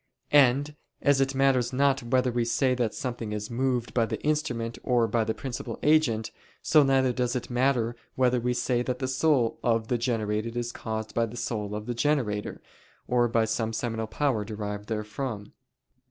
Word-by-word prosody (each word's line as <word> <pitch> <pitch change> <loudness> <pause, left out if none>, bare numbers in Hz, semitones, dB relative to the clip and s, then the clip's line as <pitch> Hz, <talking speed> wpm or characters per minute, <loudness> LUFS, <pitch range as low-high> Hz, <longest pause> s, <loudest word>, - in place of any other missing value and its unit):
And 145 +1 +4 0.3
as 140 -1 +4
it 135 0 0
matters 135 -2 +2
not 140 +1 +2
whether 125 +1 +1
we 120 0 0
say 130 +3 +1
that 120 -4 -1
something 120 -6 -4
is 105 +2 -4
moved 125 0 -1
by 115 -2 +2
the - - -3
instrument 120 -7 -1
or 120 -2 +2
by 115 +1 +1
the 110 +1 -2
principal 130 -3 -5
agent, 140 -8 +3 0.3
so 155 - +5
neither 135 -2 +3
does 125 +1 -1
it 125 - -4
matter 120 -2 +1 0.2
whether 125 -1 +2
we 125 +1 -1
say 120 0 0
that 125 0 -2
the 130 - -2
soul 130 -3 +2
of 115 -1 +1
the 120 - +1
generated 115 -1 -1
is 120 0 -2
caused 110 -2 -5
by 115 0 +1
the 115 +2 -9
soul 105 -3 -3
of 105 0 -5
the 120 - -2
generator, 120 -6 -1 0.4
or 120 -1 +3
by 115 -1 +2
some 110 0 -1
seminal 115 -1 -2
power 125 -2 0
derived 105 -1 -5
therefrom. 105 0 -4
120 Hz, 185 wpm, -27 LUFS, 110-130 Hz, 0.4 s, so